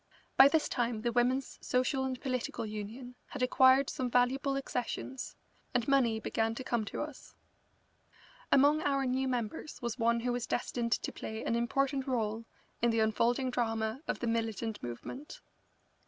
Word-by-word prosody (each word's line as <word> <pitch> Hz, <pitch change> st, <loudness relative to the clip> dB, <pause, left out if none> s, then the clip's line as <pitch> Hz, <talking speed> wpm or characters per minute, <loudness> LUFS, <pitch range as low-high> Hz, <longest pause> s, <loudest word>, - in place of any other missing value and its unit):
By 270 Hz, -, +9 dB
this 315 Hz, +2 st, +2 dB
time 235 Hz, -3 st, -1 dB
the 240 Hz, -, +1 dB
Women's 250 Hz, +3 st, +1 dB
Social 260 Hz, +1 st, +1 dB
and 260 Hz, -1 st, -3 dB
Political 255 Hz, -3 st, -2 dB
Union 215 Hz, +4 st, -6 dB
had -, -, -4 dB
acquired 260 Hz, +1 st, +5 dB
some 255 Hz, -1 st, -2 dB
valuable 265 Hz, +3 st, +2 dB
accessions, 260 Hz, 0 st, -4 dB, 0.4 s
and 240 Hz, -1 st, +1 dB
money 250 Hz, -5 st, +3 dB
began 225 Hz, 0 st, -1 dB
to 260 Hz, -, -5 dB
come 235 Hz, -3 st, 0 dB
to -, -, -3 dB
us. 300 Hz, -3 st, -10 dB, 1.2 s
Among 290 Hz, +3 st, +5 dB
our 275 Hz, -2 st, +1 dB
new 260 Hz, +1 st, 0 dB
members 250 Hz, +4 st, -3 dB
was 240 Hz, 0 st, -4 dB
one 235 Hz, 0 st, +2 dB
who 245 Hz, +1 st, 0 dB
was 245 Hz, -1 st, -2 dB
destined 235 Hz, -1 st, -1 dB
to -, -, -2 dB
play 220 Hz, 0 st, -6 dB
an 230 Hz, -, 0 dB
important 270 Hz, +3 st, 0 dB
rôle 225 Hz, -3 st, -1 dB, 0.4 s
in 235 Hz, -, +4 dB
the 225 Hz, 0 st, +1 dB
unfolding 235 Hz, +4 st, +2 dB
drama 225 Hz, 0 st, -1 dB
of -, -, -1 dB
the -, -, -1 dB
militant 225 Hz, -1 st, -2 dB
movement. 120 Hz, -, -7 dB
245 Hz, 160 wpm, -32 LUFS, 230-265 Hz, 1.2 s, By